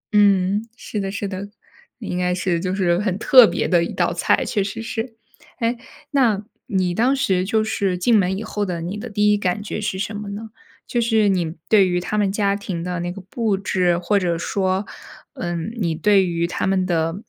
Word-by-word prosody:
嗯， 200 +1 +3
是 210 - -5
的 195 -1 -2
是 205 0 -3
的。 195 +1 -6 0.5
那 225 -5 -8
应 180 - -3
该 180 0 +1
是 180 -2 0
就 185 +1 -2
是 175 -2 +2
很 200 -3 -1
特 250 +1 +7
别 - - -1
的 175 -2 +3
一 - - -4
道 - - 0
菜， - - +1
确 205 -4 0
实 200 +3 -5
是。 225 +1 -4 0.4
诶， 235 +1 0 0.3
那 230 -7 +2 0.2
你 185 -3 0
当 250 +7 +2
时 190 -9 +1
就 220 +3 +1
是 200 -4 -1
进 220 +5 +3
门 190 0 +1
以 220 - -4
后 210 -1 -3
的 175 -4 -3
你 180 +5 -4
的 235 +3 -6
第 210 0 +3
1 205 - +2
感 205 +1 -1
觉 210 0 -4
是 190 -2 -2
什 205 +2 -3
么 205 0 -6
呢？ 215 +2 -7 0.4
就 240 - -1
是 220 -3 +3
你 175 -3 0
对 200 -4 +5
于 180 0 0
他 210 +4 -3
们 200 -2 +2
家 200 -1 +1
庭 190 -4 -5
的 180 -1 -3
那 175 +1 -3
个 195 - -8
布 205 +2 -1
置， 180 -3 +1
或 180 +4 +1
者 175 -3 0
说， 190 +2 -1 0.5
嗯， 175 +2 -4
你 170 -5 0
对 200 +2 +4
于 170 -1 -1
他 170 - -2
们 190 -1 +1
的， 165 -2 0
195 Hz, 230 characters per minute, -21 LUFS, 180-210 Hz, 0.5 s, 特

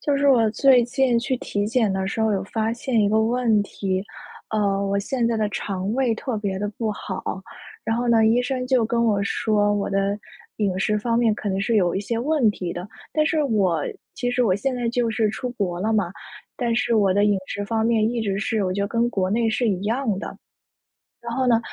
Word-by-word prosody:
就 285 -1 +1
是 280 0 +3
我 230 -5 +5
最 255 +1 +5
近 245 0 +2
去 250 +2 -1
体 205 -3 -2
检 225 -2 +1
的 190 0 -1
时 200 - -3
候 220 -1 +2
有 195 -2 0
发 220 +2 -1
现 240 0 0
一 205 - +3
个 215 +1 +3
问 230 -2 +2
题。 190 -1 -3 0.5
呃， 200 -2 +1
我 200 0 0
现 235 +4 -1
在 230 -1 +1
的 215 -1 0
肠 195 -1 -3
胃 255 -3 +1
特 225 0 -3
别 200 -2 -2
得 205 +1 -2
不 220 -2 -1
好。 - - -6 0.6
然 225 0 0
后 240 +1 -1
呢， 225 -1 +5
医 230 +2 +4
生 250 0 -2
就 250 -3 +3
跟 235 0 +1
我 210 -3 +2
说， 205 0 +1
我 205 -1 -2
的 195 +1 0 0.4
饮 195 -3 0
食 210 +2 +1
方 230 +2 0
面 225 -3 +3
可 210 - -4
能 195 0 -1
是 230 +3 0
有 180 -4 +3
一 - - 0
些 225 +3 -3
问 285 -2 +2
题 180 -3 -4
的。 175 +3 -6 0.2
但 305 +2 +2
是 315 -1 +1
我 195 - +1 0.3
其 245 -3 -2
实 245 0 +1
我 185 - +3
现 235 +7 -1
在 245 -1 -1
就 235 -1 0
是 220 -1 +1
出 245 +3 -4
国 185 -7 -3
了 220 +3 0
嘛， 195 -5 0 0.4
但 235 -2 0
是 245 -1 +1
我 200 -4 +3
的 205 +2 +3
饮 205 -1 +3
食 205 +1 -4
方 220 +1 -1
面 225 -1 +2
一 235 -1 -2
直 195 -2 -1
是 220 -1 0
我 185 - -1
觉 200 - -2
得 - - 0
跟 235 +1 +1
国 190 -5 0
内 225 +2 +1
是 235 +1 +1
一 190 -3 0
样 225 0 0
的。 - - -7 0.9
然 235 - -3
后 260 0 0
呢， 235 -2 +4
220 Hz, 255 characters per minute, -23 LUFS, 200-240 Hz, 0.9 s, 我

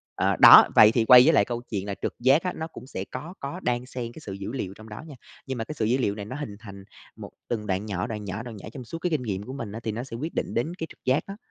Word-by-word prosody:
À, - - +1
đó, - - +10
vậy 110 0 +8
thì 115 -1 +1
quay 125 +1 +9
với 160 - +5
lại 100 - +4
câu 120 +1 -4
chuyện 100 -3 -3
là 100 -1 -4
trực - - -2
giác 135 +6 +4
á, 180 - -2
nó 160 - -5
cũng 130 - -12
sẽ 95 -7 -6
có 150 +8 -7
có 140 +6 -6
đan 120 0 -1
xem 125 -2 -6
cái 160 - -12
sự 100 - -6
dữ 100 +2 -6
liệu 100 -8 -4
trong 110 +1 -13
đó 105 - -8
nha, 150 - -10 0.3
nhưng 130 -1 -4
mà 115 - -2
cái 155 - -7
sự 110 - 0
dữ 120 +4 +2
liệu 105 -6 -1
này 105 -1 -7
nó 125 - -7
hình 140 -8 -6
thành 100 -3 -11 0.3
một - - -10 0.2
từng 105 -3 -3
đoạn 95 +2 -1
nhỏ, 95 -4 -3
đoạn 105 -3 -6
nhỏ, 100 +4 -5
đoạn 115 -3 -9
nhỏ - - -10
trong 130 -3 -8
suốt 165 +8 -7
cái 180 - -1
kinh 155 -5 -1
nghiệm 100 -4 -3
của 130 - -8
mình 115 -7 -6
á 110 - -6
thì 110 - -2
nó 115 +3 -5
sẽ 120 -3 -8
quyết 155 +7 -5
định - - -3
đến 125 +9 -1
cái 160 - -4
trực - - -18
giác 130 +3 +2
đó. 195 +1 -8
120 Hz, 330 wpm, -25 LUFS, 105-135 Hz, 0.3 s, đó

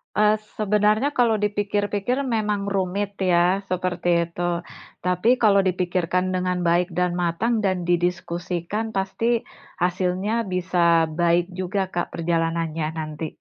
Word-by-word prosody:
Eee, 210 0 +4 0.2
sebenarnya 210 +5 +2
kalau 235 -5 +3
dipikir-pikir 205 +4 -1
memang 205 -2 -1
rumit 195 +2 -2
ya, 180 +1 +3
seperti 175 -2 0
itu. 175 0 -3 0.4
Tapi 180 +4 +1
kalau 210 -5 +4
dipikirkan 180 -1 0
dengan 180 -1 -1
baik 175 +1 +2
dan 180 0 +1
matang 215 +7 0
dan 185 -3 0
didiskusikan 175 +4 -2
pasti 225 +5 0 0.4
hasilnya 185 +5 0
bisa 175 -2 +2
baik 175 +2 +1
juga 190 0 -2
Kak 175 - -3
perjalanannya 165 -1 -1
nanti. 155 0 -4
185 Hz, 115 wpm, -23 LUFS, 175-205 Hz, 0.4 s, Eee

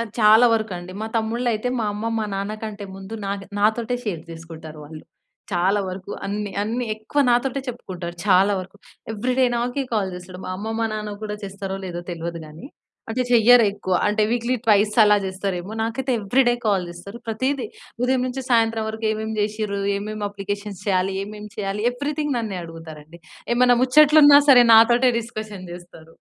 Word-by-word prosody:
అది 230 -2 -4
చాలా 220 +3 +7
వరకండి. 185 -5 -4
మా 220 - -3
తమ్ముళ్ళైయితే 230 +1 -1
మా - - 0
అమ్మ, 210 +2 -5
మా 215 - -1
నాన్న 200 +2 -3
కంటే 210 -2 -6
ముందు 195 +3 -8
నా - - -2 0.3
నాతోటే 220 +3 +1
షేర్ 170 -7 -3
జేసుకుంటారు 160 -2 -10
వాళ్ళు. 155 +1 -11 0.5
చాలా 190 +4 +2
వరకు 185 +2 -7 0.2
అన్ని, 205 0 -3
అన్ని 235 +4 -2
ఎక్కువ 220 +7 -2
నాతోటే 260 +3 +1
చెప్పుకుంటారు 180 -7 -6
చాలా 195 +1 +5
వరకు. 185 +3 -11 0.4
ఎవ్రి‌డే 250 +4 +1
నాకే 245 +4 -1
కాల్ 195 -3 0
జేస్తాడు. 180 +1 -10
మా - - -5
అమ్మ 215 +3 -5
మా 225 - +1
నాన్నకు 210 -1 -5
గూడా 210 -1 -4
చేస్తారో 195 0 -5
లేదో 175 -1 -5
తెల్వదు 170 0 -5
గానీ. 155 +9 -12 0.5
అంటే 250 +3 0
చెయ్యరు 240 0 +6
ఎక్కువ. 185 -2 -3
అంటే 210 +1 +1
వీక్లీ 240 +1 0
ట్వైస్ 210 0 +4
అలా 210 0 +5
జేస్తరేమో, 190 0 -4
నాకైతే 250 +4 -2
ఎవ్రిడే 240 +4 +2
కాల్ 190 -4 +1
జేస్తరు. 200 +6 -10
ప్రతీది 260 +4 -1 0.4
ఉదయం 255 0 +2
నుంచి 265 +1 -4
సాయంత్రం 225 -2 +2
వరకు 220 0 -6
ఏమేమి 220 0 -3
చేషిర్రు, 210 -1 -2 0.2
ఏమేమి 210 +1 -5
అప్లికేషన్స్ 205 -1 -6
చేయాలి, 190 0 +1
ఏమేమి 210 0 -9
చేయాలి, 200 0 -3
ఎవ్రిథింగ్ 290 +2 -2
నన్నే 210 -5 -4
అడుగుతారండి. 165 0 -11 0.3
ఏమన్నా 245 0 +4
ముచ్చట్లున్నా 290 +2 +7
సరే 245 -2 +8
నాతోటే 240 +3 +6
డిస్కషన్ 215 -5 -8
జేస్తరు. 175 -2 -13
210 Hz, 160 wpm, -22 LUFS, 190-235 Hz, 0.5 s, సరే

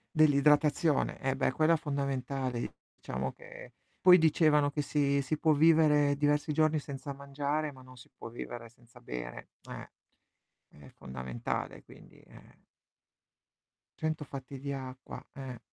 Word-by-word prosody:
Dell'idratazione, 150 0 +3
eh 135 0 0
beh 135 - +1
quella 155 +5 +3
fondamentale 135 -4 -3 0.2
diciamo 65 +1 -4
che - - -13 0.3
poi 180 -1 +9
dicevano 155 -3 +4
che 150 - -1
si 140 -1 +1
si 140 +3 -2
può 155 0 +3
vivere 150 -2 +5
diversi 145 +1 +1
giorni 155 +1 +2
senza 140 0 -7
mangiare, 140 +2 -2
ma 130 -2 -15
non 130 0 -14
si 125 - -15
può - - -8
vivere 115 0 -7
senza 120 +1 -20
bere, - - -7 0.2
eh. - - -8 0.8
È 70 -2 -15
fondamentale 65 -2 -5
quindi, - - -17
eh. - - -19 1.3
100 155 -1 -1
fatti 135 -1 -8
di 140 +1 -4
acqua, 130 -1 -7
eh. 130 -3 -7
140 Hz, 135 wpm, -31 LUFS, 130-150 Hz, 1.3 s, poi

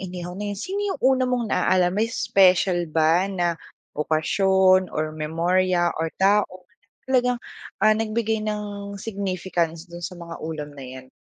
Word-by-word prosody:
inihaw 180 -1 -6
na 205 0 -4
yun 200 - -6
sino 390 - -3
yung - - -8
una 260 -1 +4
mong 250 -1 0
na-aalala 185 -1 +3
may 210 +3 +1
special 185 -5 +3
ba 165 +3 +3
na 175 -2 +1 0.4
okasyon, 185 +5 +3
or 155 0 -1
memorya 175 +3 +1
or 165 - 0
tao 190 -2 +2 0.4
na 260 - +3
talagang 250 0 +2 0.5
ah, 215 - +7
nagbigay 220 0 -1
ng 205 -1 -5
significance 185 -5 -2
dun 170 0 -9
sa - - -4
mga 170 -1 -8
ulam 155 -2 -5
na 135 - -8
yan? 130 0 -10
185 Hz, 155 wpm, -23 LUFS, 170-205 Hz, 0.5 s, ah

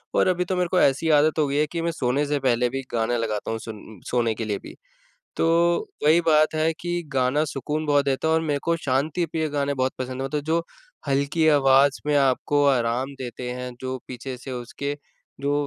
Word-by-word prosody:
और - - +4
अभी 180 0 +1
तो 185 - -2
मेरे 180 -1 +1
को 185 - +3
ऐसी 140 +4 +2
आदत 155 +2 +2
हो 150 - +3
गई 140 - -2
है 150 - +3
कि 170 -1 -2
मैं 170 0 0
सोने 135 -1 0
से 145 0 0
पहले 125 -2 +2
भी 135 +2 -3
गाने 120 +1 +1
लगाता 110 -2 -2
हूँ, 110 - -3
सुन 110 -3 -10
सोने 115 -2 +1
के 115 - -4
लिए 105 -2 -1
भी। - - -10 0.6
तो - - +1 0.6
वही 160 +3 +6
बात 155 -1 +3
है 155 +1 +2
कि 175 0 -2
गाना 130 +3 +2
सुकून 150 +2 -3
बहुत 145 -1 +3
देता 140 +3 0
है 160 - +3
और 160 - +3
मेरे 150 -3 -1
को 170 0 +1
शांतिप्रिय 155 +3 -1
गाने 140 -1 -1
बहुत 130 0 0
पसंद 130 0 -4
हैं 135 - -1
मतलब 150 +1 -2
जो 165 +1 +1 0.5
हल्की 140 +4 +1
आवाज़ 140 -1 +4
में 150 - +2
आपको 140 +1 +2
आराम 130 +1 +1
देते 125 -1 -6
हैं, 125 0 -6
जो 130 0 -4
पीछे 125 +1 -6
से 130 +1 -8
उसके 140 +4 -4 0.4
जो 140 +1 0
140 Hz, 215 wpm, -24 LUFS, 125-155 Hz, 0.6 s, वही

